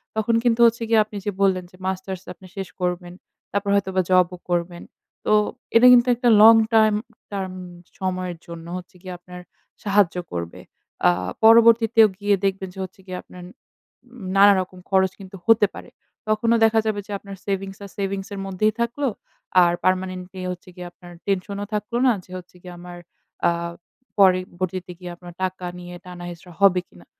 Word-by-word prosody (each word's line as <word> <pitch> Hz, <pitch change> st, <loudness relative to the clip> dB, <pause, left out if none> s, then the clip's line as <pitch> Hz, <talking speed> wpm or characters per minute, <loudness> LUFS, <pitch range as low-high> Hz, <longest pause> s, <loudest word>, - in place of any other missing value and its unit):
তখন 220 Hz, +1 st, +1 dB
কিন্তু 240 Hz, -1 st, +2 dB
হচ্ছে 230 Hz, 0 st, +2 dB
গিয়ে 225 Hz, -1 st, +5 dB
আপনি 210 Hz, -1 st, -9 dB
যে 205 Hz, -, 0 dB
বললেন, 190 Hz, -2 st, +2 dB
যে -, -, -17 dB
মাস্টার্স 190 Hz, -1 st, -4 dB
আপনি 185 Hz, -, -16 dB
শেষ 195 Hz, -1 st, -4 dB
করবেন। 180 Hz, 0 st, -2 dB, 0.4 s
তারপর 200 Hz, 0 st, -1 dB
হয়তোবা 190 Hz, -1 st, +1 dB
জবও 180 Hz, 0 st, +3 dB
করবেন। 175 Hz, 0 st, -2 dB, 0.4 s
তো -, -, +1 dB, 0.4 s
এটা 240 Hz, +2 st, +8 dB
কিন্তু 240 Hz, 0 st, +5 dB
একটা 245 Hz, 0 st, +1 dB
long 225 Hz, +1 st, +9 dB, 0.2 s
time 215 Hz, -1 st, +5 dB, 0.3 s
term 190 Hz, -2 st, -4 dB, 0.5 s
সময়ের 185 Hz, -2 st, -3 dB
জন্য 170 Hz, -1 st, -9 dB
হচ্ছে 180 Hz, 0 st, -11 dB
গিয়ে 185 Hz, -1 st, -7 dB
আপনার 180 Hz, 0 st, -11 dB, 0.4 s
সাহায্য 200 Hz, -3 st, +2 dB, 0.2 s
করবে। 85 Hz, -1 st, -5 dB, 0.5 s
আ -, -, +7 dB, 0.3 s
পরবর্তীতেও 225 Hz, 0 st, +6 dB
গিয়ে 205 Hz, 0 st, +2 dB
দেখবেন 190 Hz, -1 st, -1 dB
যে 190 Hz, -, -11 dB
হচ্ছে 185 Hz, -, -10 dB
গিয়ে 185 Hz, -1 st, -6 dB
আপনার 180 Hz, -1 st, -13 dB, 0.7 s
উম 235 Hz, -6 st, -10 dB
নানা 200 Hz, +1 st, +8 dB
রকম 185 Hz, 0 st, -9 dB
খরচ 190 Hz, -1 st, +3 dB
কিন্তু 195 Hz, 0 st, -11 dB
হতে 225 Hz, -2 st, +5 dB
পারে। -, -, -10 dB, 0.4 s
তখনও 230 Hz, +2 st, +2 dB
দেখা 225 Hz, 0 st, +3 dB
যাবে 215 Hz, -2 st, -1 dB
যে -, -, -9 dB
আপনার 200 Hz, 0 st, -10 dB
সেভিংস 195 Hz, -1 st, -3 dB
আর -, -, -11 dB
সেভিংসের 195 Hz, 0 st, -4 dB
মধ্যেই 195 Hz, +3 st, 0 dB
থাকলো, 240 Hz, +5 st, -1 dB, 0.6 s
আর 175 Hz, 0 st, +3 dB
পার্মানেন্টলি 185 Hz, 0 st, -1 dB
হচ্ছে 180 Hz, 0 st, -10 dB
গিয়ে 180 Hz, -1 st, -8 dB
আপনার 175 Hz, 0 st, -15 dB, 0.2 s
টেনশনও 200 Hz, +1 st, -2 dB
থাকলো 210 Hz, +3 st, -2 dB
না, -, -, +6 dB
যে -, -, -19 dB
হচ্ছে 180 Hz, 0 st, -13 dB
গিয়ে 180 Hz, 0 st, -10 dB
আমার 175 Hz, 0 st, -10 dB, 0.5 s
আ -, -, +2 dB, 0.7 s
পরে 190 Hz, -2 st, +6 dB, 0.2 s
ভর্তিতে 185 Hz, 0 st, -3 dB
গিয়ে 180 Hz, -1 st, -7 dB
আপনার 175 Hz, 0 st, -12 dB
টাকা 185 Hz, 0 st, -3 dB
নিয়ে 175 Hz, 0 st, -9 dB
টানা 180 Hz, -1 st, -9 dB
হেচড়া 175 Hz, +1 st, -11 dB
হবে 190 Hz, -2 st, +5 dB
কিনা? 85 Hz, 0 st, -19 dB
190 Hz, 170 wpm, -22 LUFS, 180-210 Hz, 0.7 s, long